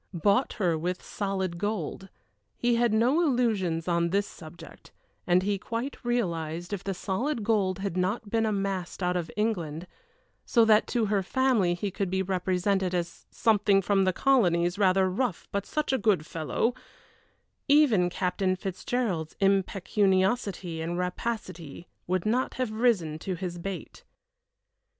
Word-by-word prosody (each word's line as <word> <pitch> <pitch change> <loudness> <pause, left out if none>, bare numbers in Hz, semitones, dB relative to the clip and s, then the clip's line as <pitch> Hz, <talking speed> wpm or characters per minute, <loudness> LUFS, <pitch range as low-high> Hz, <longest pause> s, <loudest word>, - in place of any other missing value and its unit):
Bought 200 - +2
her 175 -7 0
with 180 +3 -3
solid 190 -4 -3
gold 195 -2 -3 0.5
he 240 0 +1
had 235 -1 +2
no 240 +9 +3
illusions 215 - +1
on 170 -1 +1
this 200 +3 +1
subject, 165 -1 -13 0.4
and 180 +1 +4
he 200 0 0
quite 235 +8 -5
realized 175 -7 -2
if 195 - -4
the 195 -1 -3
solid 225 +7 -2
gold 200 -4 +1
had 195 -3 -3
not 190 +5 -1
been 225 +2 +1
amassed 195 -4 -2
out 180 0 +1
of 175 -2 -2
England, 175 -7 -1 0.6
so 230 -1 +4
that 215 -1 +4
to 235 -3 0
her 205 -1 +1
family 220 -4 +2
he 195 +3 -3
could 195 0 -2
be 190 +1 0
represented 185 0 0
as 170 -1 -4
"something 205 -3 +3
from 195 0 +2
the 185 - +3
colonies 175 -7 +2
rather 190 -1 +4
rough, 200 +1 -2
but 200 0 -2
such 305 -3 -1
a 265 - +2
good 200 -7 +2
fellow" 165 +9 -1 0.9
even 270 -12 +4
Captain 185 +1 0
Fitzgerald's 185 -2 -3
impecuniosity 195 -1 +1
and 170 +2 -3
rapacity 180 -4 -4 0.2
would 185 0 0
not 245 +4 0
have 255 -4 -2
risen 215 -9 +1
to 185 +2 -3
his 175 -1 -5
bait. 195 +2 -7
195 Hz, 145 wpm, -28 LUFS, 175-220 Hz, 0.9 s, and